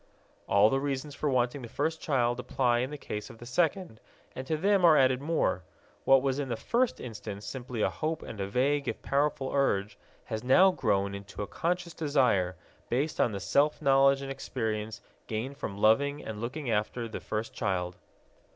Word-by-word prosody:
All 100 +2 +5
the 135 - +2
reasons 140 +1 -3
for 150 - -1
wanting 130 +1 +1
the 120 - -7
first 160 +7 -2
child 120 -4 +1
apply 125 -1 +1
in 130 +2 -1
the 150 - -6
case 105 -5 -6
of 115 - -12
the 120 - -11
second, 165 - 0 0.4
and 130 +1 -6
to 155 - 0
them 195 +3 +2
are 165 -3 +7
added 130 -1 +3
more. 150 - 0 0.4
What 135 -1 +6
was 135 0 0
in 140 -2 -3
the 120 - -1
first 240 - 0
instance 105 -4 -7
simply 120 +1 -4
a - - +3
hope 155 0 -3
and 105 - -7
a 95 - -2
vague 140 +7 +1
if - - -4
powerful 140 -1 0
urge 105 -7 0 0.2
has 110 +1 -5
now 185 +10 +6
grown 100 - 0
into 100 +1 -6
a - - -6
conscious 175 0 -2
desire, 125 - +1 0.3
based 140 +6 0
on 120 - +2
the 100 - -4
self 145 +9 +2
knowledge 135 -1 +4
and 135 - -5
experience 110 -5 -4 0.3
gained 120 +6 -4
from 100 -8 -5
loving 140 +8 +2
and 110 -1 -6
looking 125 +2 -3
after 110 +2 -1
the 110 - -6
first 110 +1 -4
child. 90 -3 -2
130 Hz, 190 wpm, -29 LUFS, 110-145 Hz, 0.4 s, are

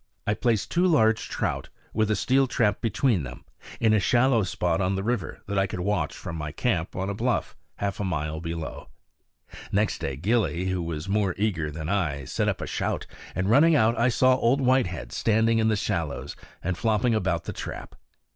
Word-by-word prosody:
I 105 - +2
placed 110 -4 0
two 180 +2 +3
large 110 -10 +3
trout, - - -2 0.2
with 110 0 +1
a 110 - +2
steel 130 +7 +2
trap 105 -4 +1
between 115 - +1
them, 65 -2 -8 0.3
in 110 -2 +4
a 110 - +4
shallow 120 +3 +3
spot 90 -2 0
on 95 +1 +1
the 95 - -2
river 115 -6 -2
that 100 -1 0
I 95 - +2
could 90 - -5
watch 100 +1 -1
from 80 - -6
my 75 -1 -4
camp 85 0 -1
on 95 +1 -2
a 100 - -2
bluff, 120 +3 -1 0.2
half 100 -1 -3
a - - -1
mile 80 -4 -2
below. 85 0 -6 0.8
Next 105 +1 +1
day 70 - -3
Gillie, 95 - +1
who 95 -1 -1
was 80 -1 -4
more 100 -2 +1
eager 95 -7 0
than 80 +1 -6
I, 80 -8 -1
set - - 0
up - - -2
a - - -2
shout; - - -2 0.3
and 95 +2 0
running 150 +9 +5
out 115 -3 +4
I 120 +2 +3
saw 130 +2 +4
Old 130 +3 +2
Whitehead 125 - +1
standing 115 +1 +2
in 110 - +2
the 110 - +3
shallows 85 -8 -2 0.3
and 90 +1 -1
flopping 110 +3 +1
about 95 -6 0
the - - -5
trap. - - -7
100 Hz, 200 wpm, -26 LUFS, 85-115 Hz, 0.8 s, running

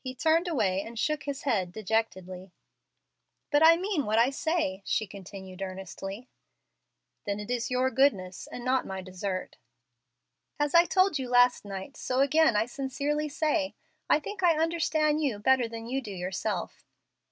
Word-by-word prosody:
He 255 -1 -5
turned 325 +5 +2
away 205 - +1
and 230 +3 -9
shook 305 +5 -1
his 285 -1 -4
head 195 -10 0
dejectedly. 185 -3 -3 1.0
"But 290 - +4
I 330 +1 +8
mean 360 - -1
what 215 +1 +1
I 240 +4 +4
say," 295 - -1
she 215 - 0
continued, 190 -1 -10
earnestly. 195 +4 -6 1.0
"Then 200 0 -1
it 210 +3 -6
is 240 -1 -1
your 255 +1 +1
goodness, 200 -10 +1
and 245 - -8
not 255 0 +2
my 190 -1 -5
desert." 185 0 -5 1.0
"As 295 0 0
I 340 0 +7
told 370 -4 +2
you 255 -2 -4
last 245 -2 +4
night, 195 +6 -7
so 255 0 -1
again 280 -2 +4
I 210 +1 +3
sincerely 285 +4 -2
say, 300 -1 0 0.3
I 300 - +5
think 395 +6 -7
I 340 -3 +4
understand 315 -2 +1
you 270 -8 0
better 255 +3 +3
than 225 0 -7
you 260 +3 -2
do 220 - -9
yourself." 190 0 -4
250 Hz, 165 wpm, -28 LUFS, 195-295 Hz, 1.0 s, I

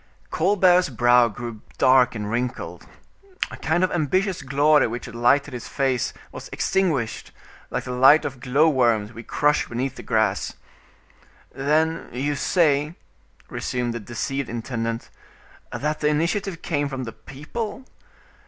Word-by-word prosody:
Colbert's 180 -1 +3
brow 120 0 +4
grew 115 -1 -7 0.2
dark 130 -2 +4
and 105 -2 -4
wrinkled. 120 +1 -4 0.6
A - - -6
kind 165 +3 0
of 185 - +1
ambitious 185 +4 0
glory 145 +2 +3
which 120 +1 -5
had 115 - -9
lighted 135 +4 +2
his 120 - -6
face 135 -3 0 0.2
was - - -9
extinguished, 155 -12 -1 0.4
like - - -3
the 125 - -6
light 130 +5 +6
of 135 -2 -5
glow 135 +6 +3
worms 120 -7 +2
we 115 - -8
crush 150 +4 +1
beneath 125 +2 -3
the - - -7
grass. 110 -4 0 1.0
"Then 155 +4 0
you 140 +4 -1
say," 150 0 +1 0.5
resumed 125 -2 -3
the 120 - -4
deceived 120 +5 -4
intendant, 115 -1 -4 0.6
"that 150 +1 -2
the 150 - +1
initiative 170 +4 -1
came 145 -3 -1
from 135 -2 -4
the 115 - -6
people? 205 - -6
135 Hz, 140 wpm, -23 LUFS, 120-155 Hz, 1.0 s, light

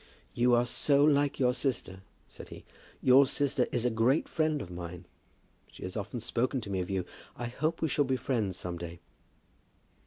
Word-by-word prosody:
"You 120 0 +4
are 120 +1 +3
so 140 +3 +3
like 145 -1 +3
your 125 -2 +3
sister," 120 -8 -3 0.3
said - - -12
he. - - -11 0.4
"Your 130 +2 +7
sister 135 -2 0
is 120 -1 -1
a 125 - +2
great 115 +7 +2
friend 155 -2 0
of 90 -9 -7
mine. 90 0 -7 0.7
She - - -11
has 90 - -6
often 105 +3 -4
spoken 120 +3 -1
to 105 -3 -7
me 95 - -1
of 90 - -3
you. 95 -2 -1 0.3
I 120 - -5
hope 155 +7 -2
we - - +3
shall 145 0 +2
be 130 0 0
friends 110 -9 -1
some 85 -1 -5
day." 85 0 -7
120 Hz, 190 wpm, -30 LUFS, 95-140 Hz, 0.7 s, Your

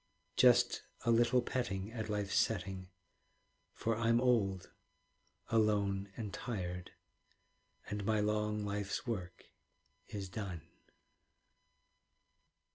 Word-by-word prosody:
Just - - +5 0.2
a 115 - +4
little 120 +2 +4
petting 105 -5 -2
At 110 -2 -4
life's 105 -2 -1
setting; 95 -3 0 0.8
For 115 0 -1
I'm 115 +1 +3
old, 105 -7 +2 0.8
alone, 100 -3 +2
and 105 -4 -4
tired, 90 -6 -4 0.9
And 105 0 -3
my 110 +1 +2
long 105 0 0
life's 100 0 -2
work 95 -7 -4 0.6
is 100 -2 -5
done. 90 -3 -5
105 Hz, 95 wpm, -35 LUFS, 95-115 Hz, 0.9 s, Just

